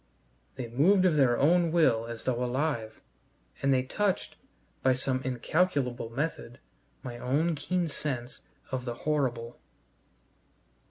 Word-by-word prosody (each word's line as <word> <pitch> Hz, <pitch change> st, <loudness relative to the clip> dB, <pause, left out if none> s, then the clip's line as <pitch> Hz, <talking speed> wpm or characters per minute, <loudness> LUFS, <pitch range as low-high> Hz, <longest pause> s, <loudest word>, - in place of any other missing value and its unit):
They 125 Hz, -, -5 dB
moved 175 Hz, -, +4 dB
of 175 Hz, -4 st, +4 dB
their 130 Hz, -5 st, +4 dB
own 170 Hz, +3 st, +3 dB
will 120 Hz, -9 st, +3 dB
as 115 Hz, -1 st, -6 dB
though 125 Hz, -1 st, 0 dB
alive, 125 Hz, -3 st, -2 dB, 0.6 s
and 140 Hz, -, +2 dB
they 130 Hz, -1 st, +3 dB
touched, 195 Hz, +8 st, -1 dB, 0.5 s
by 130 Hz, -, +4 dB
some 130 Hz, 0 st, -1 dB
incalculable 130 Hz, -1 st, 0 dB
method, 130 Hz, -1 st, -4 dB, 0.5 s
my 120 Hz, -3 st, -6 dB
own 150 Hz, +8 st, +1 dB
keen 175 Hz, +4 st, -1 dB
sense 135 Hz, -4 st, -3 dB, 0.3 s
of 130 Hz, -1 st, -3 dB
the 120 Hz, -1 st, -3 dB
horrible. 125 Hz, -6 st, -1 dB
130 Hz, 125 wpm, -29 LUFS, 120-155 Hz, 0.6 s, moved